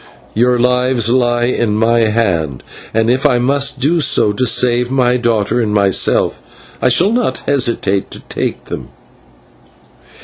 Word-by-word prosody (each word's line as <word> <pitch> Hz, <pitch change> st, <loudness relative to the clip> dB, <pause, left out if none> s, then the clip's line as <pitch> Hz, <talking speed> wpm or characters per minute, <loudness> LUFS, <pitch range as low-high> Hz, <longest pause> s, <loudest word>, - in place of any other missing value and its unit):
Your 125 Hz, +2 st, +2 dB
lives 125 Hz, -1 st, +1 dB
lie 120 Hz, -1 st, +1 dB
in 120 Hz, -3 st, -1 dB
my 115 Hz, +1 st, +2 dB
hand, 90 Hz, -, -1 dB, 0.3 s
and 115 Hz, 0 st, 0 dB
if 125 Hz, +3 st, +1 dB
I 140 Hz, -5 st, +3 dB
must 140 Hz, +2 st, 0 dB
do 155 Hz, +6 st, +1 dB
so 125 Hz, -7 st, +2 dB
to 125 Hz, +5 st, -1 dB
save 120 Hz, +1 st, +2 dB
my 125 Hz, -2 st, +1 dB
daughter 115 Hz, -1 st, 0 dB
and 110 Hz, -2 st, -1 dB
myself, 100 Hz, -2 st, +1 dB, 0.4 s
I 130 Hz, -, +3 dB
shall 170 Hz, -, +3 dB
not 235 Hz, -, -1 dB
hesitate 120 Hz, -8 st, 0 dB
to -, -, -11 dB
take -, -, -5 dB
them." -, -, -7 dB
120 Hz, 145 wpm, -14 LUFS, 115-130 Hz, 0.4 s, I